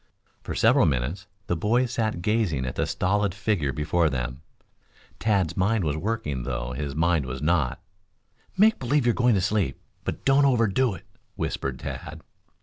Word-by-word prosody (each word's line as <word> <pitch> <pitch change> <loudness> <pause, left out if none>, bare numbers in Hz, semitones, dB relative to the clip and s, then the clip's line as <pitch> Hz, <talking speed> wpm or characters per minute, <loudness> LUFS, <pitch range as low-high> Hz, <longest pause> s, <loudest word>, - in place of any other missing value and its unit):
For - - -5
several - - +4
minutes 75 - -2 0.2
the 90 - -1
boys 120 +8 +1
sat 110 -7 -1
gazing 100 - +1
at 65 - -3
the - - 0
stolid 100 0 0
figure 100 -9 0
before 80 +3 +1
them. 65 +1 -4 0.8
Tad's 95 -6 +1
mind 100 +2 +1
was 75 -3 0
working, 80 - -2
though - - -3
his 70 +2 -4
body 85 -1 +2
was 65 +1 -5
not. 75 -4 +1 0.8
"Make 220 +3 +5
believe 135 +1 +1
you're 120 - +4
going 120 -2 +3
to 95 - +2
sleep, 95 -8 0 0.2
but - - -5
don't 135 +1 +5
overdo 120 -3 +2
it," 80 - -13 0.3
whispered 65 -2 -3
Tad. - - -7
90 Hz, 160 wpm, -25 LUFS, 70-110 Hz, 0.8 s, Make